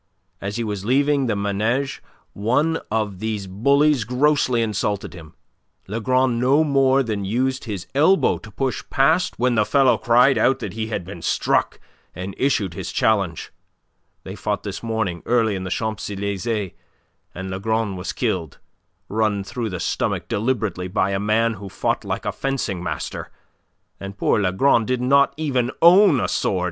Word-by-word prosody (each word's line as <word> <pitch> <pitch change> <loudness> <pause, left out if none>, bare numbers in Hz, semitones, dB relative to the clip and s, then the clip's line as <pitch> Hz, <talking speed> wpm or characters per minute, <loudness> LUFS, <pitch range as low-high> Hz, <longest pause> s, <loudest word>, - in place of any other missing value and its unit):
As 100 +1 -4
he 120 - -2
was 105 -3 -4
leaving 140 +3 +2
the 110 - 0
Manege 110 +7 -1 0.3
one 145 +10 +1
of 105 -4 -2
these 110 -2 -3
bullies 140 +7 +2
grossly 125 0 +2
insulted 105 -3 -2
him. 85 -2 -12 0.5
Lagron 120 +3 +1
no 135 +5 +4
more 135 -2 +3
than 105 -4 -3
used 130 +6 -1
his 100 -6 -5
elbow 160 +8 +3
to 110 - -12
push 130 +5 -3
past 160 +7 +2
when 125 +1 +2
the 110 -2 +3
fellow 135 +3 +3
cried 120 +1 +4
out 130 +3 +3
that - - -6
he 110 0 -3
had 105 -5 -4
been 90 -2 -9
struck, - - 0 0.4
and 90 +3 -5
issued 105 -10 +1
his - - -5
challenge. 100 -7 0 0.7
They - - -7
fought - - -3
this - - -5
morning 110 -7 -2
early 115 -3 +2
in 95 -1 -4
the - - -4
Champs 110 +1 -3
Elysees, 100 0 -3 0.6
and 95 +1 -5
Lagron 110 +1 -1
was 90 - -4
killed, 80 -4 -2 0.5
run 105 -2 0
through 115 +3 -4
the 90 -3 -5
stomach - - -2
deliberately 105 -5 -1
by 95 +1 0
a 95 - -1
man 110 +3 +1
who 100 -2 -9
fought - - -1
like - - -4
a - - 0
fencing 130 -9 -3
master, 90 - -5 0.7
and 100 0 -8
poor - - +2
Lagron 105 +6 +3
did 125 +2 -1
not 140 +2 +3
even 130 -6 0
own 175 -3 +6
a - - 0
sword. 95 - 0
110 Hz, 165 wpm, -22 LUFS, 100-130 Hz, 0.7 s, own